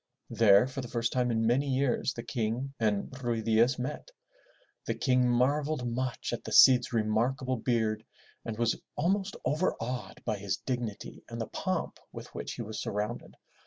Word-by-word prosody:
There 110 -2 +6
for 130 +1 -5
the 125 - -6
first 115 0 -1
time 125 -1 +1
in 115 -1 +1
many 130 +5 +2
years, 130 -1 +1
the 115 - -5
King 120 +3 -2
and 105 -3 0
Ruy 115 -2 -1
Diaz 115 +4 +3
met. 130 - -5 0.8
The - - 0
King 125 -2 +2
marveled 140 +2 +1
much 125 +1 -2
at - - -4
the - - -7
Cid's 130 -2 +7
remarkable 120 +4 0
beard 110 -2 0 0.4
and 110 -2 -5
was 115 -1 0
almost 190 +5 0
overawed 130 -4 -2
by 110 -3 -1
his 100 -1 -2
dignity 120 -5 -5
and - - -6
the - - -1
pomp - - -3
with - - -10
which - - -5
he - - -5
was 110 +1 -5
surrounded. 105 +4 -4
120 Hz, 165 wpm, -30 LUFS, 110-130 Hz, 0.8 s, Cid's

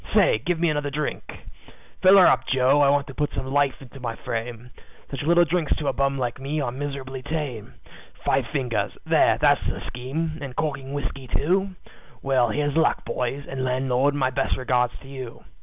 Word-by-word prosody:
Say, - - +5
give 175 +2 0
me 170 - +2
another 145 -1 -1
drink. 150 +1 -3 0.8
"Fill 190 +1 +7
her 185 - +8
up, - - +3
Joe, 130 +2 +3
I 140 - +5
want 140 0 +2
to 135 - -10
put 150 +2 -1
some 130 - -3
life 140 0 +1
into 135 +1 -12
my 115 -3 -4
frame 120 +2 -5 0.4
Such 140 - -4
little 170 +3 +4
drinks 165 -1 0
to 150 - -1
a - - -1
bum 140 0 0
like 125 -1 -2
me 145 +3 -2
are 135 -4 -1
miserably 135 -1 -5
tame; 140 -7 -5 0.5
Five 130 -3 +2
fingers 130 -6 -1
there, - - +4
that's - - +4
the - - -3
scheme 155 +6 -4
and 135 -3 -6
corking 140 -3 -3
whiskey, 135 -2 -4
too. 185 +9 0 0.5
Well, 130 -3 +2
here's 145 +4 -1
luck, 160 - +2
boys, 135 +3 -3
and 135 -1 -4
landlord, 130 +2 +1
my 130 -2 +1
best 135 +1 0
regards 125 -1 0
to 135 - -14
you. 130 -3 -8
135 Hz, 190 wpm, -24 LUFS, 130-150 Hz, 0.8 s, her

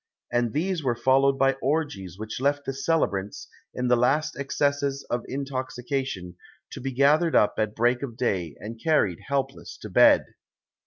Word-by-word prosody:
And 120 -1 +1
these 170 - -1
were 125 -3 +1
followed 135 +3 +3
by 135 0 +3
orgies 130 - -2
which 110 +3 -6
left 145 +1 +1
the 135 - -3
celebrants, 120 -10 -1 0.2
in 125 0 -2
the 125 - +5
last 145 +6 +1
excesses 140 0 -1
of 120 -1 -1
intoxication, 130 -7 -4 0.3
to - - -7
be 135 +1 -3
gathered 150 +6 +3
up 105 - +4
at 110 -1 -1
break 120 +2 +2
of 120 -5 -6
day 90 - -1
and 115 +2 -8
carried 130 - +2
helpless 140 -1 -3
to - - -9
bed. - - +6
130 Hz, 160 wpm, -25 LUFS, 115-140 Hz, 0.3 s, bed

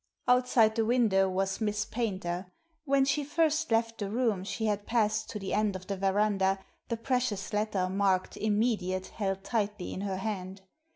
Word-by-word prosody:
Outside 250 -3 +4
the 225 0 +1
window 215 -5 +3
was 195 +3 -1
Miss 210 0 0
Paynter. 190 -6 -3 0.4
When 275 -1 +3
she 285 +2 +1
first 315 +1 +1
left 230 0 +1
the 200 -2 -2
room 220 -4 0
she 220 +3 -3
had 205 -1 -1
passed 220 -2 +1
to - - -4
the 195 -2 -4
end 210 -2 +1
of 185 0 -7
the 200 - -3
verandah, 195 0 +2 0.3
the 230 - -2
precious 230 -4 -1
letter, 210 -3 0
marked 190 -1 +1
"Immediate," 205 -4 0
held 195 -2 -3
tightly 210 -4 -2
in 190 - -5
her 195 -2 -2
hand. 190 -1 -4
210 Hz, 170 wpm, -30 LUFS, 195-230 Hz, 0.4 s, Outside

